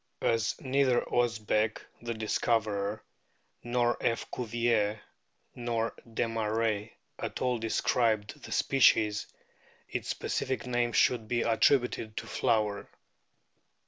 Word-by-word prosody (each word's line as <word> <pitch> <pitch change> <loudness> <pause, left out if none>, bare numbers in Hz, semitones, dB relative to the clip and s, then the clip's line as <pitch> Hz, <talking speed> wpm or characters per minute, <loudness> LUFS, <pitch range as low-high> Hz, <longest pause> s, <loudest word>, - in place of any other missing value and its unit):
* - - -48
As 115 -2 -1
neither 130 -2 +2
Osbeck, 110 -2 +1 0.2
the 115 0 -4
discoverer, 110 -1 0 0.6
nor 120 0 +1
F. 115 - 0
Cuvier, 115 -3 0 0.5
nor 115 -2 -2 0.2
Desmarest 110 -1 -1 0.3
at - - -4
all 125 -2 0
described 110 -1 0
the - - -10
species, 110 -5 +3 0.6
its - - -4
specific 130 - -2
name 120 -1 0
should 115 -2 +2
be 120 +1 0
attributed 115 -1 +2
to - - -3
Flower. 105 -2 0
115 Hz, 105 wpm, -30 LUFS, 110-120 Hz, 0.6 s, species